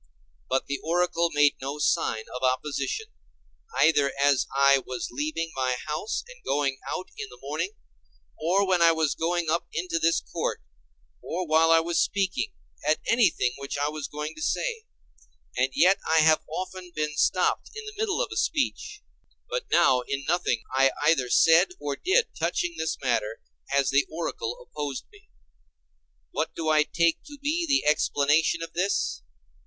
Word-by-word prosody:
But 130 - +1
the 140 -1 -3
oracle 170 0 +1
made 145 -1 +3
no 140 +2 -4
sign 110 -6 +1
of 125 - -5
opposition, 150 - -1 0.7
either 145 -3 +4
as 140 -2 +3
I 140 0 +5
was 125 -2 -5
leaving 155 +5 -3
my 130 -1 0
house 155 +8 -3
and - - -14
going 140 -2 0
out 185 - -4
in 210 - -5
the 125 - -13
morning, 155 +9 -3 0.7
or 185 +5 +2
when 185 -2 +2
I 165 0 +6
was 160 -2 +1
going 170 -1 -1
up 170 - 0
into 165 0 -2
this 165 0 +3
court, - - -3 0.6
or 180 +2 -3
while 160 +1 +4
I 165 0 +6
was 170 0 0
speaking, 195 -2 0 0.3
at 155 +2 +2
anything 225 - +3
which 140 0 -5
I 145 +1 0
was 155 -1 -5
going 150 +1 -5
to 155 - -11
say; 460 - -2 0.7
and 125 +1 +2
yet 185 +3 +5
I 160 0 +4
have 155 0 +5
often 185 +2 -5
been 150 -1 -2
stopped - - +1
in 435 0 -7
the 425 - -7
middle 435 +2 0
of - - -6
a - - -6
speech; 420 +8 -1 0.5
but - - -2
now 130 -7 +4
in 140 0 -3
nothing 160 -8 0
I 135 0 +5
either 150 -5 +3
said 170 +7 +5
or 145 -1 -3
did 445 - +2
touching 350 -1 0
this 160 - -2
matter 115 -3 0 0.3
has 140 -1 +2
the 140 +1 +3
oracle 155 -7 -4
opposed 145 -3 -5
me. - - -20 1.0
What - - -2
do 160 -1 -2
I 155 -1 +5
take 170 +2 +1
to 290 -1 -11
be 310 +5 -1
the 280 - +2
explanation 150 +2 +2
of 165 - -8
this? 185 - 0
160 Hz, 170 wpm, -26 LUFS, 140-185 Hz, 1.0 s, I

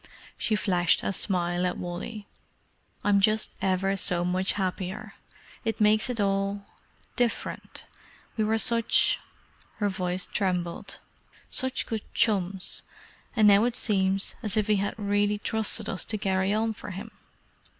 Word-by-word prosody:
She 215 - 0
flashed 180 -5 +2
a - - -1
smile 175 -2 0
at 180 - -3
Wally. 180 +5 -6 0.8
"I'm 200 -1 +4
just 215 +2 +3
ever 190 +1 +1
so 175 -2 0
much 185 +2 +1
happier. 190 +1 -3 0.5
It 225 -2 -2
makes 215 +3 +4
it 245 -3 -2
all—different. 200 +4 -3 0.5
We 220 - +1
were 220 +1 +2
such—" 230 +1 +3 0.6
her 205 -2 0
voice 185 -1 -1
trembled—"such 185 +7 -3
good 220 -3 -3
chums, 195 -3 +1 0.5
and 215 -3 +5
now 200 +1 +7
it 245 -1 0
seems 195 -3 +1
as 220 -2 -1
if 215 - +2
he 210 -1 +2
had 200 +1 -1
really 205 0 +1
trusted 220 +1 +1
us 185 - -2
to 215 - -2
carry 190 -1 0
on 220 +1 +1
for 210 - -9
him." 205 +4 -7
200 Hz, 135 wpm, -27 LUFS, 190-215 Hz, 0.8 s, now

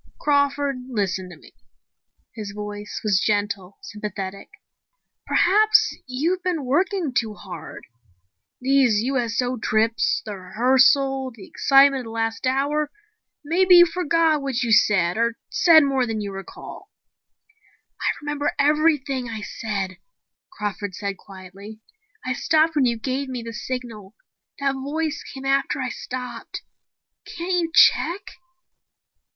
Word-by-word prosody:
"Crawford, 285 -1 +1
listen 190 -5 -2
to 175 - -12
me." - - -18 0.8
His 210 -3 -7
voice 210 0 -6
was 200 -3 +2
gentle, 205 -3 -1
sympathetic. 200 - -6 0.8
"Perhaps 425 +4 +4
you've 320 +9 -1
been 345 -6 -2
working 345 +2 0
too 220 -3 -1
hard. 185 -4 -10 0.7
These 255 -5 +3
USO 250 -1 -1
trips, 220 +1 +1
the 210 -2 -5
rehearsal, 260 +7 +2
the 200 -4 -12
excitement 275 0 +4
of - - -6
the - - -8
last 225 +2 -2
hour. 285 +3 0 0.6
Maybe 360 +4 +5
you 345 0 +9
forgot 330 -3 +1
what 265 -3 -2
you 235 - -1
said, 195 -4 +3
or 235 0 0
said 325 -3 +6
more 270 -3 +1
than 225 -1 -3
you 205 -1 -4
recall." 195 0 -10 1.1
"I - - -1 0.2
remember 295 0 -2
everything 285 -3 +1
I 220 -2 -6
said," 195 -5 -4 0.5
Crawford 205 - -5
said 200 0 -4
quietly. 195 +3 -12 0.5
"I 255 - -1
stopped 315 +4 +2
when 280 -3 +3
you 235 -1 +1
gave 265 +4 -3
me 250 -2 -5
the 230 0 -7
signal. 235 -4 -6 0.4
That 275 -1 0
voice 290 +3 -3
came 270 0 -10
after 275 0 +1
I 255 -1 -2
stopped. 250 0 -7 0.6
Can't 350 +2 -5
you 325 - -8
check 350 +2 +4
255 Hz, 130 wpm, -23 LUFS, 210-285 Hz, 1.1 s, you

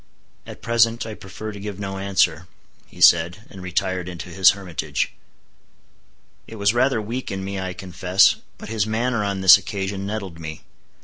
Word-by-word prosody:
"At - - -11
present 115 0 +2
I 110 - -6
prefer 105 +2 -8
to 100 - -9
give 100 -1 -6
no 95 -1 -5
answer," 95 -4 +1 0.4
he - - -16
said, 85 +5 +5
and 95 - -10
retired 90 0 -2
into 90 0 -8
his 95 +1 +5
hermitage. 80 -6 -3 1.3
It 115 - -10
was 100 0 +2
rather 125 0 +2
weak 115 +5 -5
in 95 0 -4
me 100 0 -4
I 95 -1 -4
confess, 90 +1 +2 0.2
but - - -10
his 110 -2 -1
manner 115 0 0
on 100 -1 -2
this 95 0 +9
occasion 100 0 -4
nettled 100 -5 -5
me. 80 -1 -7
95 Hz, 170 wpm, -22 LUFS, 90-105 Hz, 1.3 s, this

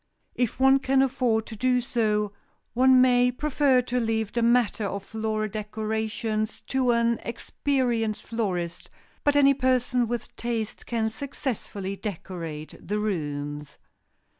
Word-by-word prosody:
If 245 -1 -1
one 270 +1 +6
can 270 0 +3
afford 245 -4 +1
to 225 - -8
do 250 +3 +2
so, 210 -4 0 0.4
one 255 +2 +6
may 250 -1 +4
prefer 270 -1 +2
to 250 0 -1
leave 220 -2 -1
the 235 - 0
matter 235 -2 +3
of 200 0 -3
floral 215 0 -2
decorations 215 +1 -3
to 260 -2 +1
an 235 -1 +2
experienced 235 -2 -1
florist, 180 -7 -3 0.3
but 290 0 +3
any 280 -1 +6
person 255 -2 +1
with 240 +1 -4
taste 230 -2 -4
can 225 -2 0
successfully 220 -7 -4
decorate 165 -6 -6
the 210 - -2
rooms. 145 -7 -3
230 Hz, 130 wpm, -26 LUFS, 210-250 Hz, 0.4 s, one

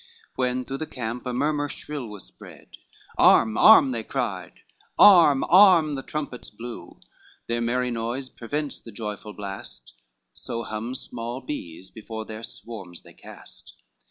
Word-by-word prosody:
When 125 0 -1
through 135 0 -5
the 155 - -4
camp 120 0 -5
a - - -1
murmur 145 +3 0
shrill 145 -5 -6
was 105 -3 -8
spread, - - -14 0.4
Arm, 110 -1 +5
arm, 135 - +7
they 115 -2 -2
cried; 105 -8 -4 0.4
arm, 165 -9 +7
arm, 180 -5 +6
the 135 - -3
trumpets 145 -4 -6
blew, 115 -5 -10 0.5
Their 120 0 -2
merry 125 +1 0
noise 120 +3 -3
prevents 145 +4 -5
the 115 - -11
joyful 105 -1 -6
blast, 95 -12 -7 0.4
So 115 0 -5
hum 110 +3 -5
small 120 0 -5
bees, 95 - -7
before 110 0 -7
their 110 0 -8
swarms 100 -7 -8
they - - -15
cast. - - -12
120 Hz, 145 wpm, -25 LUFS, 110-135 Hz, 0.5 s, arm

